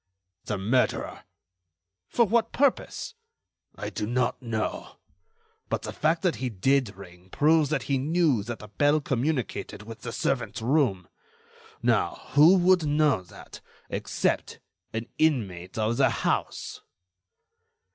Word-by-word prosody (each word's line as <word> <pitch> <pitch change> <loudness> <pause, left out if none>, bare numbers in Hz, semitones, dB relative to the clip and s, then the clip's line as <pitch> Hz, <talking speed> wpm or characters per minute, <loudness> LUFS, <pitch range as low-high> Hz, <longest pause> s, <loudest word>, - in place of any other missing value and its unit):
"The 105 - -2
murderer." 115 +7 0 0.8
"For 235 - +3
what 225 +2 +1
purpose?" 280 -1 0 0.6
"I - - -5
do 105 - -3
not 125 +2 0
know. 115 -3 -3 0.7
But - - -2
the - - -5
fact 160 +2 +1
that 180 -3 +1
he 130 -1 -2
did 120 +2 +1
ring 90 -1 -14
proves 155 +4 +3
that 150 -4 -1
he 135 -2 0
knew 155 -4 +2
that 120 0 -4
the 105 - -11
bell 145 +7 +2
communicated 135 -5 -2
with 115 +1 -9
the - - -6
servant's 125 -3 -2
room. 115 - +1 0.8
Now, - - 0
who 155 +7 +7
would 180 -1 +4
know 150 -6 +2
that, 90 - -13 0.3
except - - -1 0.3
an 115 +1 -3
inmate 100 - 0
of 110 +2 0
the 135 -2 +4
house?" 115 - -2
130 Hz, 130 wpm, -27 LUFS, 110-155 Hz, 0.8 s, who